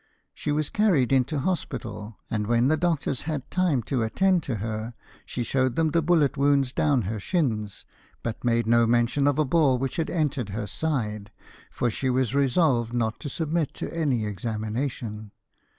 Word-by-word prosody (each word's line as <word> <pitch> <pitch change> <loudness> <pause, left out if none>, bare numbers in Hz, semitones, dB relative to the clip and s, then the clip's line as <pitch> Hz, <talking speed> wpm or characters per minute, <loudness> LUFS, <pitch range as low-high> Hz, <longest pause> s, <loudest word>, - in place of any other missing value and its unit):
She 150 - -3
was 150 0 -1
carried 170 - +3
into 135 +3 +2
hospital, 115 - -3
and 105 -2 -2
when 120 +3 +3
the 155 - +4
doctors 160 -6 0
had 145 -5 -4
time 170 -9 +1
to 130 +1 -1
attend 180 - +2
to 135 -6 -3
her, 110 +2 -4 0.3
she 120 - -3
showed 130 0 +1
them 160 -1 +2
the 170 - +2
bullet 155 -3 +2
wounds 140 -2 +2
down 140 -6 +2
her 105 +3 -3
shins, 110 - -1 0.4
but 115 -1 -4
made 115 -1 +2
no 115 0 +4
mention 120 +4 +2
of 145 0 +2
a 155 - +3
ball 140 -3 +3
which 135 +1 -3
had 165 - -1
entered 145 - -1
her 105 +2 -3
side, 105 -8 -2 0.4
for 120 - -1
she 130 +4 -1
was 130 -1 +1
resolved 135 -4 +2
not 115 -2 -1
to 145 - -5
submit 160 0 -1
to - - -5
any 135 -9 0
examination. 110 +2 -4
130 Hz, 175 wpm, -26 LUFS, 115-150 Hz, 0.4 s, the